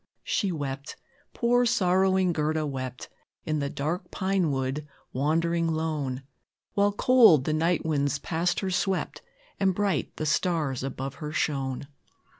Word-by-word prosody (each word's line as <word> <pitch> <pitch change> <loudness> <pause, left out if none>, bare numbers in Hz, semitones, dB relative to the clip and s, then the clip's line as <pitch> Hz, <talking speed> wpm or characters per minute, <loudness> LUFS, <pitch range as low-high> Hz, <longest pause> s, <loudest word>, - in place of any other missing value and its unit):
She 200 -5 0
wept 140 -2 -4 0.4
poor, 245 +1 +2
sorrowing 190 -5 +3
Gerda 155 0 0
wept, 130 -3 -5 0.4
In 155 -1 0
the 140 -1 -1
dark 170 +7 -3
pine 190 -3 0
wood 135 +2 -2 0.3
wandering 165 +4 +1
lone, 150 -5 -2 0.5
While 205 -1 +3
cold 225 - +6
the 155 - 0
night 165 +2 +1
winds 145 -3 +1
past 170 +4 -1
her 190 -1 -2
swept, 190 0 -1 0.4
And 190 -2 +2
bright 205 -1 -1
the 155 - -3
stars 155 -4 0
above 135 0 -4
her 150 0 -4
shone. 135 -4 -1
160 Hz, 135 wpm, -27 LUFS, 140-185 Hz, 0.5 s, cold